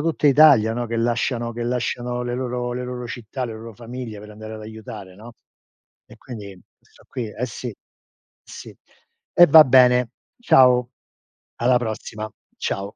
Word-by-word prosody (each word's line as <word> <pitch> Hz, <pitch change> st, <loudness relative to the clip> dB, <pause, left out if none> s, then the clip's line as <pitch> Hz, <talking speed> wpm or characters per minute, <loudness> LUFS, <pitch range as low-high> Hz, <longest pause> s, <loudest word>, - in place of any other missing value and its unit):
tutta 155 Hz, -2 st, 0 dB
Italia, 140 Hz, -6 st, +6 dB
no, 120 Hz, +1 st, -3 dB
che 115 Hz, 0 st, -4 dB
lasciano 120 Hz, 0 st, -1 dB
che 120 Hz, +1 st, -5 dB
lasciano 120 Hz, 0 st, -2 dB
le 120 Hz, 0 st, -3 dB
loro 125 Hz, -1 st, -3 dB
le 125 Hz, +1 st, -4 dB
loro 125 Hz, -1 st, -6 dB
città, 120 Hz, +2 st, -6 dB
le 115 Hz, -, -5 dB
loro 110 Hz, 0 st, -10 dB
famiglie 120 Hz, -2 st, -8 dB
per 105 Hz, +1 st, -12 dB
andare 110 Hz, +1 st, -9 dB
ad 110 Hz, -, -9 dB
aiutare, 105 Hz, -3 st, -10 dB
no, 115 Hz, +4 st, -13 dB, 0.7 s
e 110 Hz, -, -16 dB
quindi 105 Hz, -6 st, -10 dB, 0.2 s
sto -, -, -24 dB
qui, 120 Hz, -, -5 dB
eh, 125 Hz, -, -3 dB
sì, 120 Hz, +1 st, -7 dB, 0.7 s
sì. -, -, -11 dB, 0.6 s
E 175 Hz, -, +8 dB
va 155 Hz, +1 st, +9 dB
bene. 125 Hz, -2 st, +5 dB, 0.3 s
Ciao, 125 Hz, -, +4 dB, 0.7 s
alla 125 Hz, +1 st, +2 dB
prossima. 110 Hz, -1 st, -5 dB, 0.3 s
Ciao. 100 Hz, 0 st, -3 dB
120 Hz, 155 wpm, -22 LUFS, 110-125 Hz, 0.7 s, va